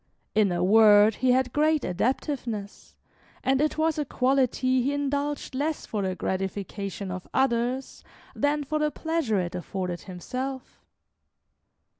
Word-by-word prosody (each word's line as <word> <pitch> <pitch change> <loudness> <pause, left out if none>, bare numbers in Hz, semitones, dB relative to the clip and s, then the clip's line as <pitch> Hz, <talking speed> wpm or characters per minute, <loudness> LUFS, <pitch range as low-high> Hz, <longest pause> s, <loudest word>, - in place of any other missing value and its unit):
In 210 -3 +3
a 175 0 0
word, 210 +1 +6
he 260 -1 +2
had 255 0 +2
great 305 0 +2
adaptiveness, 230 - -3 0.5
and 265 +1 +2
it 305 +1 0
was 315 0 +1
a - - +1
quality 255 -1 +1
he 275 +4 0
indulged 285 0 -2
less 295 +4 -2
for 210 - -3
the 190 -1 -1
gratification 195 +1 -4
of 185 0 -6
others 255 0 0 0.3
than 290 +1 +1
for 305 +2 -2
the 300 0 +2
pleasure 320 - -1
it 175 -1 -3
afforded 180 0 -4
himself. 255 +8 -6
255 Hz, 135 wpm, -26 LUFS, 200-285 Hz, 0.5 s, word